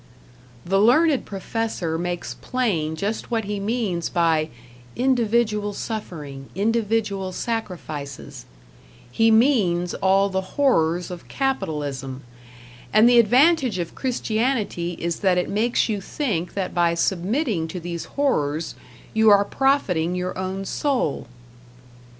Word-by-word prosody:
The 195 +2 +2
learned 270 +7 +4
professor 195 -4 -3
makes 175 +1 -3
plain 185 -12 -1
just 205 +7 -3
what 230 -2 0
he 205 0 -3
means 200 -5 -1
by 160 -2 +2 0.5
"individual 230 -4 +1
suffering, 150 - -6
individual 210 -2 0
sacrifices"; 180 - -5 0.7
he 225 - +3
means 220 -8 +3
all 195 +1 +2
the 190 +4 -4
horrors 175 - +2
of 175 -1 -9
capitalism; 145 - -3 0.7
and 215 +2 +6
the 240 0 +6
advantage 255 - +4
of 170 -2 -4
Christianity 225 -7 -1
is 170 0 -3
that 190 -3 +2
it 180 - 0
makes 225 +4 +1
you 210 -3 -2
think 195 - -3
that 195 -2 -2
by 170 -1 +2
submitting 190 - 0
to 180 +3 -6
these 170 0 -5
horrors, 160 - -1 0.4
you 220 0 +5
are 200 -1 +6
profiting 190 - +1
your 180 0 -3
own 190 +1 -4
soul. 250 - -1
195 Hz, 120 wpm, -23 LUFS, 170-230 Hz, 0.7 s, and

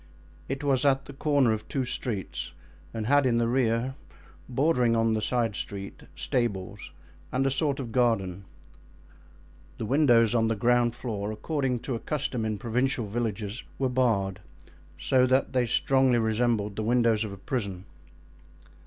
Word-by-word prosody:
It 135 +2 -3
was 135 -2 +2
at 135 -1 +2
the 140 - -10
corner 140 -4 +2
of 110 - -5
two 135 -2 -1
streets 115 -9 -4 0.4
and 110 +3 -4
had 140 +2 +4
in 120 -2 +2
the 115 0 +2
rear, 120 0 +1 0.6
bordering 125 -3 +2
on 115 0 +2
the 110 - 0
side 115 -2 0
street, 100 0 -6
stables 105 -7 -2 0.4
and 135 +1 +1
a 135 - +2
sort 140 0 0
of 120 -4 -5
garden. 100 -7 0 1.3
The 110 - -4
windows 120 -4 +4
on 115 -2 +2
the 115 - 0
ground 120 +2 +2
floor, 105 -4 -4
according 130 +1 -2
to 135 - -4
a 115 - -2
custom 135 -6 -2
in 110 -1 -2
provincial 125 +2 0
villages, 110 0 -3 0.2
were 135 -1 0
barred, 105 -7 +1 0.6
so 130 -1 +3
that 130 +2 +2
they 125 -2 +2
strongly 130 +1 +3
resembled 110 -2 0
the - - -1
windows 115 -1 +2
of 105 - -5
a 100 - -8
prison. 100 -4 -4
120 Hz, 155 wpm, -27 LUFS, 110-130 Hz, 1.3 s, had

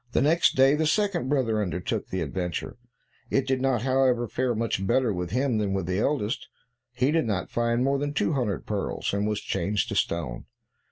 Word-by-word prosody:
Next 165 +9 +4
day, 135 +1 +5
the 155 +1 +1
second 180 -5 +1
brother 120 -7 +1
undertook 90 -2 -2
the 95 - -3
adventure; 90 +3 -3 0.5
it 135 - +1
did 130 -1 0
not, 130 -4 +1
however, 130 -2 +2
fare 125 +2 -1
much 110 -3 -1
better 125 -2 +2
with 90 -1 -3
him 125 +1 +1
than 100 -2 0
with 95 -3 -1
the 90 +2 -1
eldest; 120 -2 -1 0.4
he 125 +3 +1
did 160 -3 +2
not 100 -5 -2
find 120 +1 +1
more 140 +1 +1
than 145 0 -1
two 150 - 0
hundred 120 -8 -1
pearls, 100 -2 -2
and 100 +1 0
was 105 -1 -1
changed 105 0 -1
to - - -3
stone. 70 -8 -1
120 Hz, 190 wpm, -26 LUFS, 100-135 Hz, 0.5 s, day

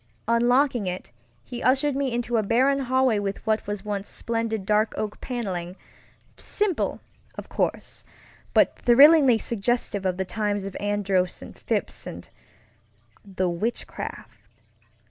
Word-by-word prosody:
Unlocking 240 -1 +3
it, 180 -8 -5 0.3
he 245 -1 -7
ushered 270 +2 +2
me 275 -2 0
into 240 0 -1
a - - +3
barren 260 +6 +2
hallway 260 -4 +2
with 200 +1 -4
what 220 -1 0
was 205 0 -4
once 205 -1 -3
splendid 225 -3 -3
dark 215 +2 +2
oak 210 -1 -4
panelingŌĆösimple, 230 - -4 0.4
of - - -8
course, - - -2 0.5
but - - +4
thrillingly 275 0 +7
suggestive 225 -2 -1
of 185 -1 -1
the 190 - -1
times 205 -1 -2
of 195 - -7
Andros 200 -3 0
and - - -11
Phips - - -3
and - - -8 1.0
the 190 -2 -2
Witchcraft. 180 +8 -4
220 Hz, 125 wpm, -25 LUFS, 200-245 Hz, 1.0 s, thrillingly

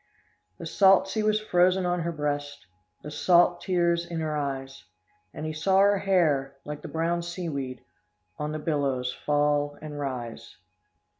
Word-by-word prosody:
The - - -8
salt 195 -1 +5
sea 215 +3 -2
was 215 0 +2
frozen 185 -2 +2
on 175 0 0
her 170 0 -2
breast, 145 - -3 0.4
The 150 - -7
salt 175 +2 +3
tears 170 -2 +1
in 170 -1 -5
her 155 -1 -2
eyes. 135 -2 -4 0.5
And 155 - -6
he 155 - -3
saw 190 +5 +1
her 200 0 +5
hair, 150 -9 +1
like 150 0 -6
the - - -7
brown 165 +1 -1
seaweed, 155 -8 -5 0.6
On 150 0 -2
the 155 - -3
billows 140 -5 -1
fall 145 0 0
and 150 -1 -7
rise." 120 -4 -6
155 Hz, 155 wpm, -27 LUFS, 145-175 Hz, 0.6 s, salt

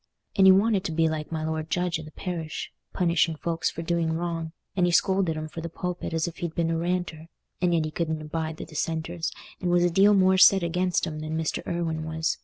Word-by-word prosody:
And 190 -2 +6
he - - +10
wanted 200 0 +3
to 165 - -1
be 160 0 +2
like 155 -1 -3
my 160 -1 -2
lord 160 0 -3
judge 175 -2 0
i' - - -6
the 155 - -10
parish, 165 -1 -5 0.2
punishing 170 -2 +2
folks 165 +2 -1
for 165 - -6
doing 165 -1 0
wrong; 165 -1 -3 0.2
and 180 -2 +3
he - - +1
scolded 190 -2 +2
'em 155 0 -4
from 165 +1 -7
the 170 - -5
pulpit 180 +1 -4
as 165 +1 0
if 170 - -7
he'd 170 -3 -4
been 165 -1 +1
a 165 - 0
Ranter, 170 -2 -2 0.3
and 180 -1 +3
yet 165 -2 +2
he 155 - -4
couldn't 160 0 -2
abide 160 +1 -4
the - - -6
Dissenters, 165 +2 -3 0.3
and 180 - -1
was 175 0 +4
a 175 - +3
deal 200 +4 +5
more 190 -1 +4
set 195 -1 +7
against 180 +1 0
'em 155 -2 -5
than 155 +1 -3
Mr. 160 -1 -1
Irwine 165 -2 -2
was. 160 0 -2
165 Hz, 235 wpm, -26 LUFS, 160-175 Hz, 0.3 s, he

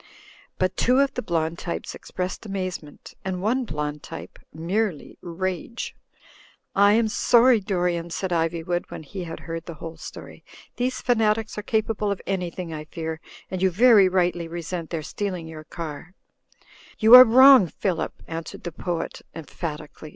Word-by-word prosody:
But 185 0 0
two 250 +6 +3
of 275 0 +2
the - - -3
blond 165 -2 -1
types 170 - -5
expressed 180 0 -5
amazement, 185 -7 -6
and 185 -1 -3
one 240 +7 0
blond 150 -4 -4
type 85 +2 -9
merely 175 +2 -2
rage. 185 +5 -4 0.8
"I 200 +1 +5
am 225 0 +3
sorry, 240 +2 +4
Dorian," 175 -4 -1
said 185 +2 -3
Iv)nvood, 170 +1 -1
when - - -8
he 180 +4 -7
had 165 - -7
heard 165 0 -6
the 170 - -7
whole 165 +1 -8
story. - - -10 0.3
"These 255 +1 -1
fanatics 220 -2 +1
are 210 - -4
capable 215 -1 -1
of 200 - -2
anything, 180 -3 -3
I 155 0 -6
fear, 160 0 -5 0.3
and 185 -1 -3
you 190 - +4
very 205 0 +6
rightly 175 -2 0
resent 170 0 -5
their 165 -3 -3
stealing 185 -1 -4
your 155 -1 -9
car 170 +3 -8 0.2
— - - -35
" - - -23
"You 220 +2 +5
are 255 0 +14
wrong, 260 -3 +8
Phillip," 180 +1 -3
answered 165 0 -7
the 175 - -4
poet, 170 +1 -4
em 160 - -7
phatically. 155 -1 -7
180 Hz, 165 wpm, -24 LUFS, 165-210 Hz, 0.8 s, are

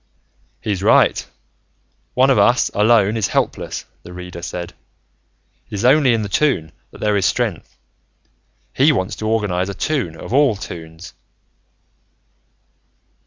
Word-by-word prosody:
"He's 100 -4 -2
right. 100 - +3 0.9
One 130 +2 +4
of 125 - +3
us, 120 +5 +3
alone, 105 0 +3
is 110 -4 0
helpless," - - -2 0.2
the 90 - -12
Reader 90 -1 -8
said. 85 0 -6 1.0
"It - - -6
is 100 - -2
only 130 -2 +5
in 110 - -1
the - - -3
Toon 95 - 0 0.2
that - - -15
there 105 -1 0
is 95 -1 +2
strength. 110 -8 -3 1.0
He 140 +4 +4
wants 100 -6 -2
to 110 - -4
organize 100 -4 0
a 100 - -5
Toon 115 - -2
of 80 - -8
all 140 -4 +4
Toons." 85 -2 -9
105 Hz, 135 wpm, -19 LUFS, 90-120 Hz, 1.0 s, only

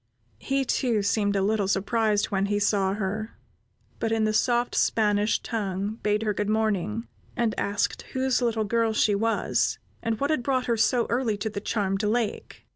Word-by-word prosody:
He, 270 - -1
too, 235 -5 +1
seemed 205 0 +1
a 195 - +2
little 205 -1 +1
surprised 205 +2 +1
when 195 0 +1
he 205 0 0
saw 200 -2 +1
her, 215 +2 -4 0.6
but 225 - -1
in 225 -1 +1
the 215 0 +1
soft 240 +2 +1
Spanish 210 -1 +2
tongue, 205 -1 -3
bade 210 +1 +1
her 210 -1 0
"Good 205 +1 -2
morning," 215 0 0 0.3
and 230 -2 +1
asked 200 0 -1
whose 260 -1 +1
little 230 -2 +1
girl 230 +1 +1
she 215 -1 +3
was, 225 +3 +1 0.2
and 225 -1 -2
what 280 +2 0
had 310 - +1
brought 255 0 0
her 235 - +1
so 230 +2 +2
early 235 -3 0
to 220 +2 -3
the 200 - -5
charmed 195 -2 -1
lake. 215 0 -2
215 Hz, 180 wpm, -26 LUFS, 205-230 Hz, 0.6 s, she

